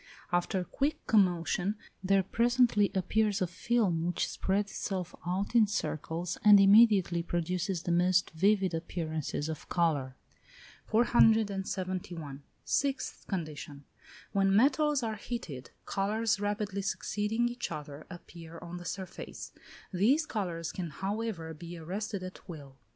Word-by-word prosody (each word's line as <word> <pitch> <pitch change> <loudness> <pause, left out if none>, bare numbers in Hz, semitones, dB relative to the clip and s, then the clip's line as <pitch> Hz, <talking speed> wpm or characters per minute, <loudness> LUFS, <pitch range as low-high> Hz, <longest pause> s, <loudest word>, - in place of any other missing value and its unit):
After 175 +2 0
quick 280 +10 -2
commotion 190 -1 +2 0.3
there 195 0 +3
presently 235 0 +3
appears 205 +2 +1
a 185 - +2
film 180 -1 0
which 175 - 0
spreads 200 +1 -1
itself 185 -4 -4
out 190 +5 -1
in 225 -3 +6
circles, 165 -3 -3
and 210 -1 +9
immediately 195 -4 +6
produces 175 +1 -2
the 175 - -1
most 180 +1 +3
vivid 190 +2 +2
appearances 160 -3 -3
of 160 -2 -6
colour. 145 -7 0 0.7
471. 190 - +1 0.2
Sixth 275 -1 -1
condition. 150 -6 -5 0.5
When 195 -1 +3
metals 280 +3 +3
are 220 -2 -2
heated, 170 - -6 0.2
colours 215 +2 0
rapidly 205 -1 -2
succeeding 210 +4 -1
each 240 -4 -4
other 150 -1 -7
appear 170 -2 -11
on 175 +1 -8
the 175 - -9
surface: 185 +1 -6 0.4
these 250 - +3
colours 175 - -3
can, 175 -3 -4
however, 190 0 -4
be 170 +2 -9
arrested 190 +4 -4
at 185 +1 -10
will. 140 -5 -9
190 Hz, 125 wpm, -30 LUFS, 170-215 Hz, 0.7 s, and